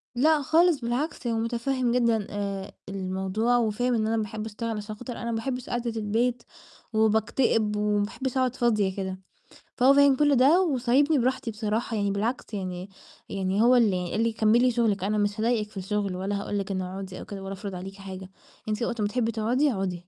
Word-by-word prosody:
لأ 300 +4 +4
خالص، 325 +2 +3
بالعكس 245 +3 -2
هو 230 -1 0
متفهِّم 240 +2 -1
جدًا 235 -4 +2
آآ، 200 -1 -4 0.2
الموضوع، 195 +5 0
وفاهم 240 +2 +1
إن 220 -2 +1
أنا 225 +1 +1
باحب 215 0 -3
أشتغل، 225 +1 -4
عشان 210 +1 -6
خاطر 245 +2 -7
أنا 235 - -3
ما 225 - -1
باحبش 250 +2 -4
قاعدة 240 -1 -2
البيت، 235 +3 0 0.5
وباكتئب، 220 0 +2
وما 210 0 +1
باحبش 260 +4 -4
أقعد 255 -1 +1
فاضية 210 -7 +1
كده. 190 -1 -4 0.6
فهو 260 +2 +6
فاهم 280 -1 +6
كل 290 0 +3
ده، 285 +9 +5
وسايبني 280 -1 +2
براحتي 255 -1 0
بصراحة، 220 +1 -2
يعني 200 -1 0
بالعكس 220 +4 -2
يعني 185 -1 -4 0.4
يعني 195 +1 0
هو 245 +2 +6
اللي 185 -7 +2
قال 220 - 0
لي: 230 -1 +1
"كمِّلي 230 +3 +4
شغلِك، 225 -5 +1
أنا 210 +2 0
مش 205 +1 0
هاضايقِك 220 -2 +1
في 210 - -13
الشغل، 200 0 -2
والّا 200 +2 -2
هاقول 205 - -3
لِك 195 0 -4
إنه 185 -1 -3
أقعدي 190 -1 -7
أو - - -8
كده 195 -2 -7
ولا 195 0 -5
أفرض 195 0 -6
عليكِ 190 +2 -7
حاجة، 190 -1 -8 0.4
أنتِ 215 +3 -1
وقت 235 -1 -2
ما 205 - +2
تحبي 230 +1 0
تقعدي، 245 +7 +1
أقعدي." 185 -4 -3
220 Hz, 195 wpm, -26 LUFS, 200-245 Hz, 0.6 s, فهو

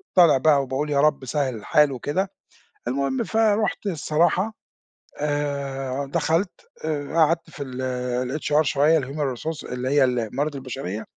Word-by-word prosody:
طالع 170 -6 +7
بقى 140 0 +4
وباقول 135 +3 -2
يا 140 -1 +2
رب 150 -3 +2
سهل 135 -1 -1
الحال 145 +6 +3
وكده 145 - -2 0.6
المهم 135 +1 0
فرُحت 220 -1 +1
الصراحة 175 +4 +1 0.7
آآ، 140 -2 -2
دخلت 170 +3 0 0.2
آآ 150 -1 -3
قعدت 165 0 +2
في 145 - -8
ال 125 +1 -3
الHR 150 +1 +3
شوية 155 +2 +3
الhuman 140 -1 -3
resource 160 +2 -5
اللي 125 +1 -2
هي 145 -1 +5
الموارد 125 +4 -1
البشرية 125 -6 -5
145 Hz, 135 wpm, -24 LUFS, 130-155 Hz, 0.7 s, طالع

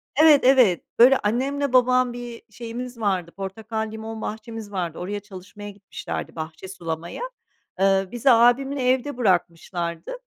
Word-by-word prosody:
Evet, 305 -1 +7
evet. 250 -8 +5 0.2
Böyle, 260 +3 +8
annemle 265 +5 -1
babam 255 0 +4
bir 240 -1 -8
şeyimiz 240 +1 -7
vardı, 190 -5 -1
portakal, 215 +3 -5
limon 220 0 -7
bahçemiz 220 -1 -6
vardı. 175 -5 -3
Oraya 205 +3 -4
çalışmaya 205 +1 -10
gitmişlerdi, 200 -1 -7
bahçe 160 +3 -7
sulamaya. 170 - -6 0.6
Eee, 195 0 +3
bizi 245 +3 +1
abimle 250 +4 +3
evde 260 +1 0
bırakmışlardı. 175 -5 -1
220 Hz, 130 wpm, -23 LUFS, 190-245 Hz, 0.6 s, Böyle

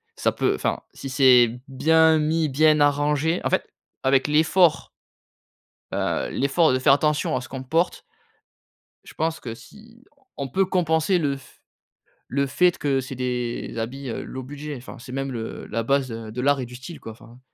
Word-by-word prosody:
ça - - +1
peut, - - 0
enfin, - - -2
si 135 - -7
c'est 130 -3 +6 0.2
bien 160 +4 +4
mis, 155 0 +1
bien 155 +2 +4
arrangé, 145 +3 +2
en - - 0
fait, - - 0 0.4
avec 135 +1 +3
l'effort 160 +3 +3 1.0
heu, - - -1
l'effort 140 +3 +2
de 130 - +2
faire 130 - +4
attention 150 0 +1
à - - -1
ce 130 - -10
qu'on 130 -1 -6
porte 165 +7 0 1.0
je - - -14
pense 160 0 -2
que 115 -3 -6
si 225 - -17 0.3
on 140 -2 -4
peut 195 +10 +1
compenser 180 -1 +1
le 145 -4 0
f 135 -1 -17 0.7
le 140 +2 0
fait 175 +6 +2
que 140 -2 +1
c'est 130 +1 -7
des 125 -1 -3
habits 130 +4 -5
low 130 +3 -6
budget, 145 +3 -7
enfin, 125 - -10
c'est 125 +2 -10
même 135 0 -3
le 115 -2 -6
la 115 +1 -2
base 135 +2 +1
de 115 0 -6
l'art 140 +1 +2
et 125 - -4
du 125 - -12
style, 130 +7 -9
quoi, 110 - -8
enfin 115 +2 -16
140 Hz, 180 wpm, -23 LUFS, 130-155 Hz, 1.0 s, c'est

